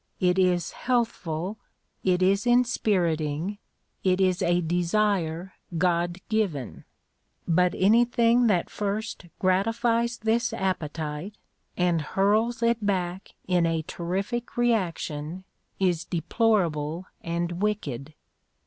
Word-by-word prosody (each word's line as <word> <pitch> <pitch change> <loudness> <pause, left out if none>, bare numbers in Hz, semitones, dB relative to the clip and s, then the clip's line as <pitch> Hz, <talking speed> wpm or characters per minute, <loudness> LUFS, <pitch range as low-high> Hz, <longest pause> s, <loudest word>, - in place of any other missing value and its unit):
It 180 0 +2
is 180 -2 +2
healthful. 215 -6 -2 0.4
It 185 -1 +2
is 195 +4 +2
inspiriting. 190 -8 +1 0.4
It 185 0 +2
is 185 0 +2
a 175 -1 +3
desire 175 0 0 0.2
God 175 0 +1
given. 190 - -2 0.6
But 180 +1 +3
anything 235 +3 +4
that 180 -6 +1
first 205 -2 -3
gratifies 230 +5 +1
this 230 +2 0
appetite 165 -2 -3 0.4
and 175 -2 +2
hurls 215 +8 +1
it 230 -1 +2
back 185 -2 -2
in 175 -2 +3
a 165 -1 0
terrific 195 +11 -3
reaction 180 -7 -1 0.4
is 180 -3 +1
deplorable 175 -3 0 0.2
and 170 +1 -3
wicked. 155 - -2
185 Hz, 100 wpm, -26 LUFS, 170-215 Hz, 0.6 s, anything